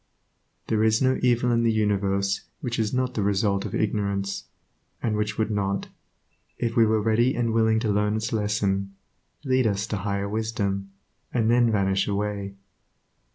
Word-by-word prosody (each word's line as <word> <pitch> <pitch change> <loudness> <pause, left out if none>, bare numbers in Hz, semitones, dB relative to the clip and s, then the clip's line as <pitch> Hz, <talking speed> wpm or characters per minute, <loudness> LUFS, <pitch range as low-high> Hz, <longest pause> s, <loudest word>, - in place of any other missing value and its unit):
There 110 -1 +1
is 110 0 +3
no 130 0 +2
evil 125 0 +2
in 115 0 +2
the 115 -1 +3
universe 100 -2 0 0.2
which 120 -2 -3
is 110 -1 0
not 130 0 0
the 110 - -1
result 100 0 +1
of - - -4
ignorance, 100 -2 -1 0.5
and 110 -3 -1
which 105 0 -2
would 110 0 0
not, 100 -1 -1 0.7
if 115 -1 -2
we 115 -2 +5
were 110 0 +2
ready 115 +4 +2
and 115 -2 0
willing 110 -1 +3
to 110 -3 0
learn 105 +1 +1
its 110 +2 -2
lesson, 100 -2 -1 0.5
lead 130 -2 +2
us 100 -1 0
to 110 - -3
higher 100 0 -2
wisdom, 100 -2 -2 0.4
and 115 -2 +2
then 120 -1 +4
vanish 95 -2 +1
away. 100 -1 -2
105 Hz, 165 wpm, -25 LUFS, 100-115 Hz, 0.7 s, we